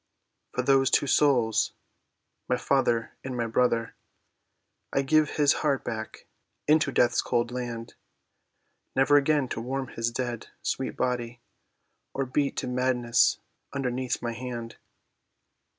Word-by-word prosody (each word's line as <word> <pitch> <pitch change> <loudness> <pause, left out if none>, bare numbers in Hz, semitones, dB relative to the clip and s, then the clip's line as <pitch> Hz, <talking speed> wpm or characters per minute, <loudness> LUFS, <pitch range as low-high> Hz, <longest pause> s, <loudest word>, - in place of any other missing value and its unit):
"For 125 - 0
these 135 0 +4
two - - +3
souls—my 125 -2 0
father 120 -3 +1
and 130 -2 -4
my 120 - 0
brother— 115 0 +1 1.0
I 135 - +1
give 155 +2 +3
his 145 -2 +5
heart 140 -3 +1
back 110 -1 -6 0.4
into 155 +1 +4
death's 120 -1 +3
cold 120 0 0
land, 120 -2 -5 1.0
Never 135 +2 +4
again 145 -1 +2
to 115 - -3
warm 130 +2 -3
his 115 0 -1
dead, 120 -1 -4 0.2
sweet - - -2
body, 120 -1 -2 0.8
Or 135 - 0
beat 140 +2 -1
to - - -2
madness 125 -2 +2 0.4
underneath 130 -2 -2
my 120 -1 -2
hand." 120 -1 -6
125 Hz, 120 wpm, -27 LUFS, 120-135 Hz, 1.0 s, his